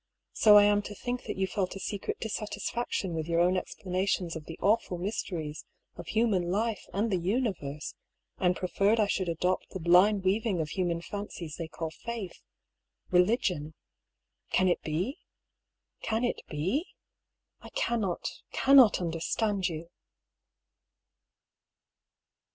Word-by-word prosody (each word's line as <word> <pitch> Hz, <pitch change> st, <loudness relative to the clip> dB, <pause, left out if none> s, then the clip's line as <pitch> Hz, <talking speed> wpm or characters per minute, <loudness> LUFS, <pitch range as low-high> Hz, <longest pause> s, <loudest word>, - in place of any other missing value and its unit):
So 210 Hz, -1 st, +7 dB
I 205 Hz, -, +8 dB
am 205 Hz, 0 st, +4 dB
to 205 Hz, 0 st, -8 dB
think 245 Hz, +3 st, -4 dB
that -, -, -4 dB
you 190 Hz, -, +2 dB
felt 190 Hz, 0 st, -2 dB
a -, -, -6 dB
secret 200 Hz, +1 st, -3 dB
dis 220 Hz, -, -4 dB
satisfaction 205 Hz, -2 st, -3 dB
with 160 Hz, -1 st, -3 dB
your 170 Hz, 0 st, +1 dB
own 180 Hz, +2 st, +4 dB
explanations 185 Hz, -1 st, -1 dB
of 160 Hz, -2 st, -7 dB
the 165 Hz, -, -8 dB
awful 200 Hz, -3 st, +2 dB
mysteries 170 Hz, -5 st, -4 dB, 0.3 s
of 170 Hz, -1 st, -9 dB
human 210 Hz, -6 st, +1 dB
life 215 Hz, +3 st, -1 dB
and 210 Hz, +3 st, 0 dB
the 185 Hz, -, +2 dB
universe, 175 Hz, -, -2 dB, 0.5 s
and 180 Hz, -1 st, +3 dB
preferred 200 Hz, +5 st, +1 dB
I 215 Hz, -, +5 dB
should 190 Hz, -3 st, -1 dB
adopt 180 Hz, +3 st, 0 dB
the 190 Hz, -, -6 dB
blind 185 Hz, +4 st, +5 dB
weaving 200 Hz, 0 st, +1 dB
of 155 Hz, -2 st, -1 dB
human 175 Hz, -1 st, -1 dB
fancies 180 Hz, -7 st, -6 dB
they 165 Hz, -, -4 dB
call 160 Hz, 0 st, -5 dB
faith 225 Hz, 0 st, -6 dB, 0.4 s
— -, -, -37 dB
religion. 180 Hz, -, +1 dB, 0.7 s
Can 185 Hz, -, +3 dB
it 175 Hz, -, +2 dB
be? 175 Hz, -, -2 dB, 0.8 s
Can 220 Hz, +2 st, -1 dB
it 245 Hz, -, -1 dB
be? 185 Hz, -, -2 dB, 0.7 s
I -, -, -11 dB
cannot, 225 Hz, -, -1 dB, 0.2 s
cannot 265 Hz, -5 st, +6 dB
understand 180 Hz, +4 st, 0 dB
you. 165 Hz, +1 st, -7 dB
190 Hz, 140 wpm, -29 LUFS, 170-215 Hz, 0.8 s, I